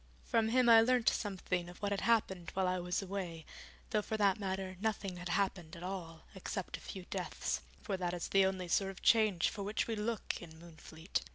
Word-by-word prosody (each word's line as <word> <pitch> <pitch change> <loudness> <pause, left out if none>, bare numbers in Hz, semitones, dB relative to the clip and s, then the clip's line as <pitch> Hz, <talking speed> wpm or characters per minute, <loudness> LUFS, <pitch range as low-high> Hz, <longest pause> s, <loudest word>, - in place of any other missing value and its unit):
From 220 -1 +2
him 250 +1 +4
I 225 -1 +9
learnt 245 0 +4
something 185 -3 -2
of 175 - -12
what 205 0 -1
had 200 - 0
happened 190 -7 +2
while 190 -1 +2
I 185 0 +1
was 180 +2 -1
away, 180 -4 -4 0.5
though 215 -1 +3
for 220 +1 -3
that 200 -1 +3
matter 190 -1 -3
nothing 200 -4 -1
had 180 0 -6
happened 180 -3 0
at 170 - -9
all, 175 -4 -5
except 190 0 -4
a - - -8
few 190 -2 -8
deaths, - - -2 0.2
for 200 -4 -2
that 180 -1 -1
is 175 - -4
the 195 -1 +5
only 185 -2 -2
sort 195 +3 +2
of 195 - -10
change 215 -7 +4
for 210 - -6
which 205 +2 0
we 225 - -2
look 220 +1 -2
in 160 -2 -11
Moonfleet. 165 0 -5
190 Hz, 210 wpm, -35 LUFS, 180-210 Hz, 0.5 s, I